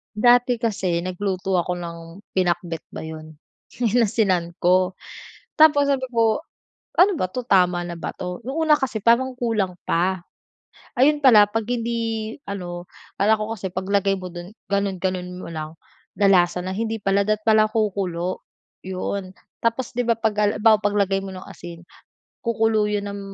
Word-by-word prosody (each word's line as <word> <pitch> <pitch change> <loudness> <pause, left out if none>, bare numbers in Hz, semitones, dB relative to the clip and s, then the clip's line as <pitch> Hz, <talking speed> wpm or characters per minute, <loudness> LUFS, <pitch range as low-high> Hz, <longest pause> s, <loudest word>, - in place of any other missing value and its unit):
Dati 245 +2 +4
kasi 195 -7 0
nagluto 185 +1 -2
ako 180 +1 0
ng 170 -1 -6 0.4
pinakbet 175 -2 -1
ba - - -6
'yon, 155 0 -8 0.5
inasinan 205 -6 +1
ko. 185 +1 +3 0.7
Tapos 290 -2 +6
sabi 260 -2 0
ko, 225 -2 +3 0.6
ano 385 +3 +7
ba 185 - -2
'to, 250 -1 -5
tama 180 -3 +3
na 175 - -6
ba 165 - -5
'to? 180 +1 -7
No'ng 315 +6 -2
una 305 - +7
kasi 255 -7 -2
parang 235 +4 +3
kulang 205 -7 -1
pa, 185 +3 +1 0.8
ayun 295 +3 +4
pala 220 -6 +7
'pag 225 +2 -2
hindi 230 -2 -2
ano 175 -4 -7 0.2
akala 215 +2 +3
ko 215 +1 -3
kasi 190 -3 -5
'pag 185 +1 -4
lagay 195 -1 +1
mo 180 -1 -8
dun, 175 +1 -8 0.2
ganun-ganun 190 -2 -1
mo - - -8
lang, 155 -1 -7 0.4
lalasa 185 -3 +4
na, 185 +1 -4
hindi 225 +1 -2
pala 200 -1 +1
dapat 215 +1 -1
pala 215 -1 +4
kukulo, 185 -5 -2 0.4
'yon. 185 +1 -4 0.3
Tapos, 230 +2 -1
'di 245 - 0
ba, 230 -1 +1
'pag 220 -2 0
haliwbawa, 210 +1 +3
'pag 205 0 +1
lagay 195 -1 +1
mo 195 - -6
ng 185 0 -9
asin, 170 0 -11 0.6
kukulo 225 -2 +1
yun 205 -1 -2
ng 200 0 -5
200 Hz, 160 wpm, -22 LUFS, 180-225 Hz, 0.8 s, ano